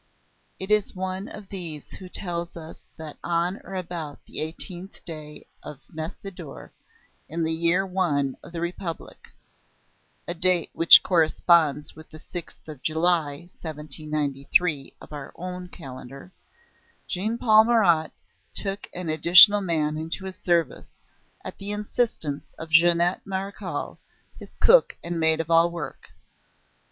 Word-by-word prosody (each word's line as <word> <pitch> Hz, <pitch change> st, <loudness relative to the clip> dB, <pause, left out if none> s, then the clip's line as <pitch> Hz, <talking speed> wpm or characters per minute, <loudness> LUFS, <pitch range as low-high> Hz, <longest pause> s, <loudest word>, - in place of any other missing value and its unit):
It 190 Hz, +2 st, -5 dB
is 210 Hz, -2 st, +2 dB
one 190 Hz, +2 st, -4 dB
of 205 Hz, -2 st, -10 dB
these 165 Hz, -6 st, -7 dB
who 185 Hz, -1 st, -10 dB
tells 175 Hz, -2 st, -5 dB
us 160 Hz, -1 st, -10 dB, 0.2 s
that 155 Hz, -2 st, -9 dB
on 175 Hz, +3 st, -1 dB
or 195 Hz, -, -8 dB
about 165 Hz, -5 st, -5 dB
the -, -, -8 dB
eighteenth 175 Hz, +4 st, -6 dB
day 155 Hz, -3 st, -9 dB, 0.2 s
of 150 Hz, -1 st, -10 dB
Messidor, 160 Hz, 0 st, -8 dB, 0.6 s
in 165 Hz, +1 st, -2 dB
the 160 Hz, -, 0 dB
year 170 Hz, +4 st, +2 dB
I 170 Hz, -8 st, 0 dB
of -, -, -13 dB
the 170 Hz, -1 st, -5 dB
Republic 170 Hz, -1 st, -6 dB, 1.0 s
(a 175 Hz, -, -1 dB
date 175 Hz, 0 st, +1 dB
which 165 Hz, -, +9 dB
corresponds 160 Hz, -3 st, +3 dB
with 155 Hz, 0 st, -14 dB
the 155 Hz, -, -11 dB
sixth 170 Hz, +1 st, -9 dB
of 150 Hz, -4 st, -9 dB
July, 160 Hz, -2 st, +1 dB, 0.2 s
1793, 150 Hz, 0 st, -2 dB
of -, -, -13 dB
our 145 Hz, -2 st, -8 dB
own 180 Hz, +1 st, -6 dB
calendar), 135 Hz, -1 st, -10 dB, 0.8 s
Jean 215 Hz, +6 st, -1 dB
Paul 220 Hz, -2 st, +6 dB
Marat 175 Hz, -10 st, +3 dB, 0.4 s
took 195 Hz, 0 st, -5 dB
an 180 Hz, -1 st, -5 dB
additional 180 Hz, +6 st, +8 dB
man 155 Hz, -4 st, 0 dB
into 165 Hz, +4 st, -4 dB
his 190 Hz, -1 st, -6 dB
service, 170 Hz, -5 st, 0 dB, 0.5 s
at -, -, -8 dB
the 200 Hz, +1 st, -3 dB
instance 210 Hz, -8 st, -1 dB
of 160 Hz, 0 st, -8 dB
Jeannette 170 Hz, +2 st, +4 dB
Marechal, 195 Hz, +1 st, -5 dB, 0.4 s
his -, -, -13 dB
cook -, -, +5 dB
and 170 Hz, 0 st, -3 dB
maid 160 Hz, 0 st, +3 dB
of 165 Hz, 0 st, -3 dB
all 165 Hz, +1 st, +5 dB
work. 170 Hz, -5 st, -7 dB
170 Hz, 135 wpm, -25 LUFS, 155-185 Hz, 1.0 s, which